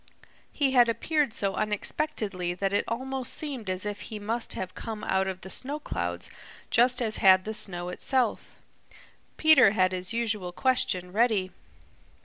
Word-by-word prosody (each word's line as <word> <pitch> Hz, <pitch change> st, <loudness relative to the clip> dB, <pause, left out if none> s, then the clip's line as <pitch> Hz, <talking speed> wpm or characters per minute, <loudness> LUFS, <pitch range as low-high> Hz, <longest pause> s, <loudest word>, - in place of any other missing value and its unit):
He 280 Hz, -3 st, +1 dB
had 245 Hz, -2 st, +5 dB
appeared 295 Hz, +3 st, 0 dB
so 200 Hz, -3 st, -1 dB
unexpectedly 210 Hz, -, -2 dB
that 195 Hz, +2 st, -2 dB
it 205 Hz, -, +1 dB
almost 260 Hz, +2 st, -2 dB
seemed 265 Hz, -10 st, -4 dB
as 185 Hz, +2 st, -2 dB
if 205 Hz, -1 st, -4 dB
he 215 Hz, +3 st, -7 dB
must 225 Hz, +3 st, -2 dB
have 190 Hz, -, -5 dB
come 220 Hz, -2 st, -7 dB
out 190 Hz, 0 st, 0 dB
of 185 Hz, -1 st, -5 dB
the 190 Hz, -, -9 dB
snow 285 Hz, +3 st, -2 dB
clouds 85 Hz, -, -4 dB, 0.4 s
just 245 Hz, +1 st, +3 dB
as 220 Hz, -1 st, 0 dB
had 185 Hz, -1 st, +5 dB
the 220 Hz, -, -3 dB
snow 175 Hz, -4 st, 0 dB
itself. 245 Hz, +5 st, -1 dB, 0.8 s
Peter 280 Hz, -10 st, +6 dB
had 185 Hz, -3 st, +2 dB
his 185 Hz, 0 st, -1 dB
usual 220 Hz, -6 st, -1 dB
question 185 Hz, -8 st, 0 dB
ready. 210 Hz, -3 st, +1 dB
215 Hz, 155 wpm, -27 LUFS, 185-250 Hz, 0.8 s, Peter